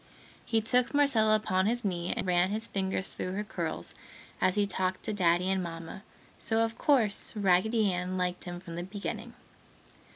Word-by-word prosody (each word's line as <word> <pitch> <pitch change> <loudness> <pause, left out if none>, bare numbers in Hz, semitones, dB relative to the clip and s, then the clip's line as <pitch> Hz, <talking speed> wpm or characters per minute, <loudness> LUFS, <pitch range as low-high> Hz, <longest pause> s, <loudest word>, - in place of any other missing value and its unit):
He 225 -1 +1
took 250 +5 +2
Marcella 230 -7 +4
upon 190 -3 +1
his 240 0 0
knee 175 -3 -1
and - - -1
ran 180 0 +3
his 215 +2 -1
fingers 190 -1 -2
through 185 - -4
her 205 +2 -2
curls 165 - -4 0.5
as 185 0 +3
he 205 -1 +3
talked 185 -1 -2
to 215 - -1
Daddy 180 -2 +2
and 190 -1 +1
Mamma, 165 +1 -7 0.4
so, 225 0 +1
of 225 0 -5
course, 235 -6 +2
Raggedy 205 +1 +3
Ann 180 +1 -2
liked 180 0 -2
him 175 -1 -6
from 170 -2 -8
the - - -2
beginning. 200 +2 -6
190 Hz, 175 wpm, -30 LUFS, 180-220 Hz, 0.5 s, Marcella